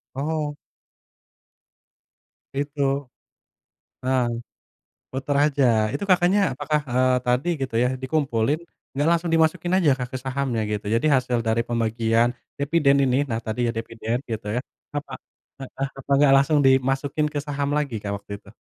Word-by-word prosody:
Oh. 150 +1 -2 2.0
Itu. 145 0 -3 1.2
Heeh. 130 -1 +2 0.9
Puter 135 +2 -2
aja. 145 -2 +2 0.3
Itu 145 +8 -3
kakaknya 180 +2 +4
apakah, 150 +3 -1
eee, 130 +1 +3 0.2
tadi 125 +7 +1
gitu 130 -4 -3
ya, 125 - +3
dikumpulin? 135 -2 0 0.3
Nggak 145 +3 0
langsung 170 0 +1
dimasukin 160 +2 +2
aja, 165 -6 +4
Kak, 125 - -3
ke 130 - -3
sahamnya 130 -3 -1
gitu, 105 -1 -3
jadi 115 +7 +1
hasil 125 -2 0
dari 115 +1 +2
pembagian, 115 0 +1 0.3
deviden 140 -1 +3
ini, 130 0 +2
nah 115 - 0
tadi 110 +3 -2
ya - - +2
deviden 115 0 -3
gitu 110 -2 -4
ya, - - +1 0.4
apa 140 -2 -5 0.5
heeh, 135 +1 -4
apa 135 - -11
nggak 145 -2 +5
langsung 140 +3 +3
dimasukin 135 +3 +2
ke 145 - -2
saham 140 0 -2
lagi, 145 -5 -1
Kak, 100 -1 -3
waktu 100 +1 -11
itu? 100 - -17
135 Hz, 145 wpm, -24 LUFS, 120-145 Hz, 2.0 s, nggak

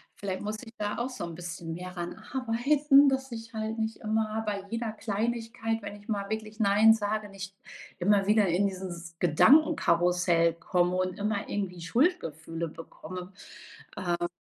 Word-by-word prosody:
vielleicht 190 -2 -4
muss 210 +1 -3
ich 225 -2 -12
da 210 0 -2
auch 240 +2 -1
so 255 -6 -6
'n 170 -1 -5
bisschen 170 -1 -6
mehr 180 +2 -6
daran 175 -1 -5 0.2
arbeiten, 275 +3 +4
dass 265 -1 -2
ich 230 0 -8
halt 220 +1 -3
nicht 220 0 -2
immer 220 0 -1
bei 205 -2 -3
jeder 230 -1 -2
Kleinigkeit, 225 +1 -2
wenn 205 0 -6
ich 205 - -21
mal 200 -2 -2
wirklich 215 0 -4
nein 220 +1 +6
sage, 210 -1 -2
nicht 195 0 -8 0.4
immer 195 +2 +3
wieder 210 0 +4
in 180 +4 +2
dieses 175 -3 -5
Gedankenkarussell 175 - +4
komme 175 +2 +1
und 185 0 -1
immer 205 0 -1
irgendwie 190 -4 -3
Schuldgefühle 165 - 0
bekomme. 180 +4 -9 0.8
Äh 175 0 +1
205 Hz, 160 wpm, -29 LUFS, 180-225 Hz, 0.8 s, nein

